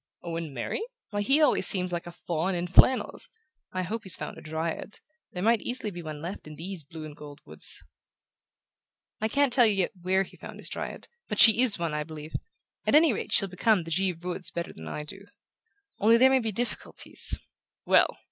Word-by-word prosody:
"Owen 165 -2 -4
marry? 130 - -4 0.3
Why, 205 0 -1
he 270 +8 +3
always 300 - +6
seems 180 -2 +3
like 175 0 -3
a - - -7
faun 170 +2 -2
in 175 0 -2
flannels! 220 +8 +4 0.4
I 185 0 -2
hope 215 +6 -4
he's 190 -4 +2
found - - -6
a - - -11
dryad. 160 +5 -4 0.3
There 180 - -4
might 230 0 +3
easily 245 -4 -3
be 175 -2 -7
one 155 -2 -7
left 175 -1 -7
in 155 - -9
these 175 +1 -6
blue 155 +2 -9
and 150 -1 -10
gold 145 -1 -11
woods." 80 +1 -4 1.4
"I 220 - +1
can't 280 +2 +2
tell 245 -3 +6
you 210 - +2
yet 190 -2 +1
where 190 +2 +2
he - - -15
found - - -10
his - - -2
dryad, - - -6 0.2
but - - -4
she 225 +1 +8
IS 255 -5 +4
one, 170 -3 -2
I 150 - -1
believe: 155 0 -8 0.5
at - - +4
any 310 -3 +6
rate - - -5
she'll 195 - +4
become 190 +1 +1
the 165 - -9
Givre 180 -1 -1
woods 180 0 -1
better 170 0 -5
than 80 0 -10
I 150 - -5
do. 195 +6 -11 0.7
Only 225 +3 +5
there 260 +2 +6
may 265 - +4
be 225 -3 -2
difficulties 240 +4 -1 0.2
" - - -65 0.2
"Well! - - +4
180 Hz, 210 wpm, -27 LUFS, 160-220 Hz, 1.4 s, she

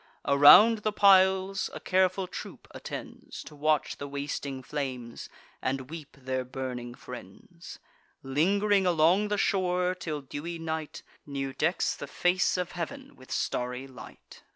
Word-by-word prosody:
Around 145 +11 +8
the 215 +1 -1
piles 190 -1 +4
a - - -5
careful 185 0 +1
troop - - -9
attends, - - -8
To 150 - -12
watch 155 +1 0
the 140 - -6
wasting 140 -1 -5
flames, 130 -5 -5 0.3
and 130 +1 -3
weep 155 -4 -9
their 130 0 -2
burning 125 -1 -6
friends; - - -11 0.5
Ling'ring 195 +8 +2
along 175 +5 +3
the 205 0 -1
shore, 180 -2 +1
till 160 -5 -5
dewy 145 +5 -6
night 160 -1 -5 0.2
New 135 -1 -4
decks 165 +7 0
the 145 - -7
face 180 +6 +1
of 180 -1 -3
heav'n 270 +10 -6
with 130 - -16
starry 125 +1 -2
light. 130 -4 -13
155 Hz, 135 wpm, -28 LUFS, 135-185 Hz, 0.5 s, Around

